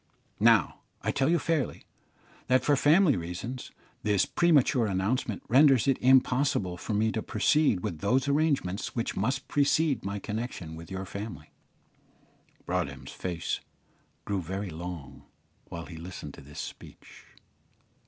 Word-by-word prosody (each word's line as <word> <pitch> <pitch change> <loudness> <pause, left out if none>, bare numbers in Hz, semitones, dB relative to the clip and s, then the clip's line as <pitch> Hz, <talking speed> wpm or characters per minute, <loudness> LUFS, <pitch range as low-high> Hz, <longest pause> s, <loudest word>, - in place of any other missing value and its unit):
Now, - - +4 0.2
I - - +1
tell 135 +2 +1
you 170 - +4
fairly, 160 -5 -1 0.6
that, 130 0 +3
for 145 - +4
family 150 +2 +5
reasons, 90 +9 -5 0.3
this 105 -3 +2
premature 145 -8 +3
announcement 100 +3 -1
renders 135 -1 +5
it 135 - +2
impossible 130 -7 +3
for 105 +4 -4
me 110 +2 +2
to 110 - -2
proceed 115 -1 +2
with 80 -3 -4
those 125 - +1
arrangements 140 - 0
which 115 - -2
must 130 +1 -1
precede 145 -2 +2
my 100 +1 -3
connection 105 -6 -5
with 80 0 -10
your 95 0 -5
family." 100 +3 -7 1.1
Broadhem's 70 -7 -3
face 85 -3 -3 0.7
grew 100 -2 -1
very 95 +2 -4
long 80 -4 -7 0.4
while 85 0 -7
he 85 - -10
listened 85 +3 -8
to - - -12
this 70 +2 -11
speech. - - -10
110 Hz, 135 wpm, -28 LUFS, 90-135 Hz, 1.1 s, family